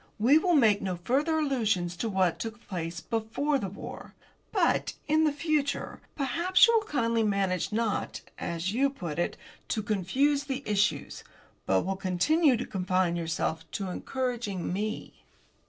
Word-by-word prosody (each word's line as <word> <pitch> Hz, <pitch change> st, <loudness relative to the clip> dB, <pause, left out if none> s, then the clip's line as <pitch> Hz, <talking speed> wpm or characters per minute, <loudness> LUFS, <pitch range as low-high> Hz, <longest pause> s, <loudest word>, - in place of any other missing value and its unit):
We 260 Hz, +8 st, +5 dB
will 355 Hz, 0 st, +2 dB
make 220 Hz, -7 st, +4 dB
no 185 Hz, -2 st, -2 dB
further 295 Hz, -, +1 dB
allusions 220 Hz, -, 0 dB
to 225 Hz, -, -2 dB
what 190 Hz, -4 st, +1 dB
took 225 Hz, +1 st, -6 dB
place 170 Hz, -2 st, -4 dB
before 235 Hz, +6 st, -1 dB
the 195 Hz, -, -3 dB
war. 200 Hz, -, -9 dB, 0.4 s
But, -, -, +1 dB
in 310 Hz, +1 st, +3 dB
the 305 Hz, -, +3 dB
future, 290 Hz, -1 st, -1 dB
perhaps 340 Hz, +6 st, +4 dB
you 465 Hz, 0 st, +3 dB
will 435 Hz, -2 st, +2 dB
kindly 230 Hz, -5 st, +1 dB
manage 195 Hz, -4 st, 0 dB
not, 220 Hz, -1 st, -1 dB, 0.2 s
as 170 Hz, +3 st, -2 dB
you 275 Hz, +4 st, +3 dB
put 175 Hz, -, -5 dB
it, 175 Hz, -, -1 dB, 0.3 s
to 215 Hz, -, -1 dB
confuse 260 Hz, +9 st, +1 dB
the 275 Hz, -1 st, -3 dB
issues, 210 Hz, 0 st, 0 dB, 0.4 s
but 95 Hz, +8 st, +2 dB
will 195 Hz, +1 st, -1 dB
continue 245 Hz, -, +3 dB
to 245 Hz, -, -3 dB
confine 185 Hz, -2 st, 0 dB
yourself 165 Hz, -1 st, -2 dB
to 195 Hz, -2 st, -3 dB
encouraging 235 Hz, -4 st, -3 dB
me." 215 Hz, +3 st, -4 dB
220 Hz, 155 wpm, -28 LUFS, 185-280 Hz, 0.4 s, We